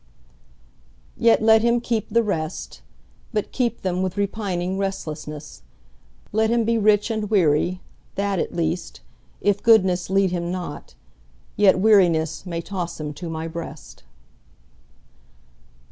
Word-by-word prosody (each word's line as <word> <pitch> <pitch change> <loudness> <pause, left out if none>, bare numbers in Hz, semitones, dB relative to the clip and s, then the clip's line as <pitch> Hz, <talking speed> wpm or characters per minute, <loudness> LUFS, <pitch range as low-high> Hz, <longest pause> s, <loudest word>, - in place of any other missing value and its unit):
Yet 230 -1 +3
let 220 0 +6
him 235 +1 +3
keep 230 -2 -2
the 230 +2 +3
rest, 160 -5 -4 0.5
But 210 -2 -2
keep 245 -2 -1
them 185 -1 -1
with 190 +1 -2
repining 195 -3 -2
restlessness; 155 -6 -5 0.7
Let 220 +1 +2
him 235 0 +2
be 230 +1 +1
rich 210 +1 +3
and 215 -2 -2
weary, 180 -2 +2 0.3
that 200 -2 -1
at - - -2
least, 165 - -3 0.4
If 205 -1 +1
goodness 185 -6 +4
lead 195 -1 +2
him 175 -1 -2
not, 180 -1 -6 0.6
yet 205 -2 +5
wearinessMay 170 -4 +2
toss 175 -4 -5
him 150 -1 -4
to 165 +3 -7
My 160 0 -4
breast. 160 -2 -8
190 Hz, 125 wpm, -23 LUFS, 170-215 Hz, 0.7 s, let